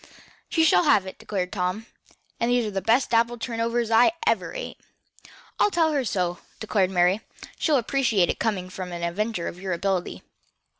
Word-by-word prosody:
"She 325 - +2
shall 320 +2 +4
have 245 -10 +4
it," 190 - -9
declared 185 -3 -3
Tom, 185 +3 -2 0.5
"for 235 - +1
those 245 -1 +2
are 210 - -3
the 195 -1 -2
best 230 +5 +2
apple 235 +1 +2
turnovers 230 0 -2
I 240 +8 +5
ever - - +1
ate." - - -6 0.8
"I'll - - +4
tell 330 -5 +2
her 285 -3 0
so," 180 -5 -1 0.2
declared 205 -4 +1
Mary. 180 +2 +2 0.4
"She'll 305 -3 +3
appreciate 235 -7 +1
it - - -2
coming 190 -5 -2
from 185 -1 -6
an 170 0 -5
inventor 180 +1 -2
of 180 - -7
your 190 -1 -2
ability." 185 0 -2
215 Hz, 180 wpm, -25 LUFS, 185-240 Hz, 0.8 s, I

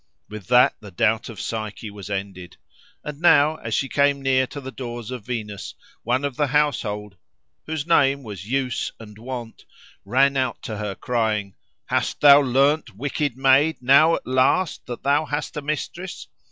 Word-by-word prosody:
With 105 -3 -9
that 125 0 +5
the 105 - -11
doubt 85 - 0
of - - -9
Psyche 110 -1 -5
was 100 -1 -10
ended. 95 -3 -6 0.5
And 150 0 -7
now, 155 -2 +5
as 115 -6 -3
she 135 - 0
came 140 0 +2
near 130 -1 +2
to 145 - -8
the 135 -1 -8
doors 120 -3 -7
of 125 -4 -7
Venus, 105 -5 -5 0.3
one 125 +4 0
of 140 -3 -4
the 145 - +2
household, 110 -9 -1 0.5
whose 155 -2 -3
name 140 -4 +3
was 100 -3 -9
Use 130 -1 -1
and 105 -2 -12
Wont, 120 -1 -7 0.4
ran 135 +6 +2
out 130 -3 -1
to 110 - -5
her, 105 -2 -4
crying, 110 -5 -1 0.3
"Hast - - -1
thou 145 0 +8
learned, 140 +4 +2
Wicked 140 +2 -2
Maid! 135 +4 +4
now 140 +6 +5
at - - -7
last! 130 +7 +1
that 120 -1 -7
thou 145 +3 +2
hast 145 +1 -4
a 150 - -3
mistress?" 155 +5 -5
130 Hz, 170 wpm, -23 LUFS, 110-145 Hz, 0.5 s, thou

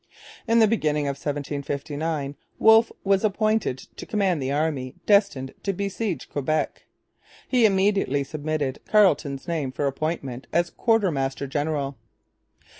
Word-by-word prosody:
At 230 - +3
the 220 - +6
beginning 150 -9 +1
of 140 - 0
1759 145 +1 -3 0.2
Wolfe 220 +1 +6
was 195 0 +2
appointed 215 - +1 0.2
to - - -7
command 190 -7 +1
the 130 +1 -1
army 145 -4 -1
destined 200 -11 +2
to 195 - -1
besiege 200 - -3
Quebec. 155 +2 -2 0.6
He 245 -4 +4
immediately 195 -8 +2
submitted 145 -1 -3
Carleton's 180 -9 +3
name 155 -6 -2
for 145 +2 -2
appointment 135 -3 -3
as 170 0 +1
quartermaster 150 - +1
general. 140 -2 -2
155 Hz, 120 wpm, -25 LUFS, 140-200 Hz, 0.6 s, the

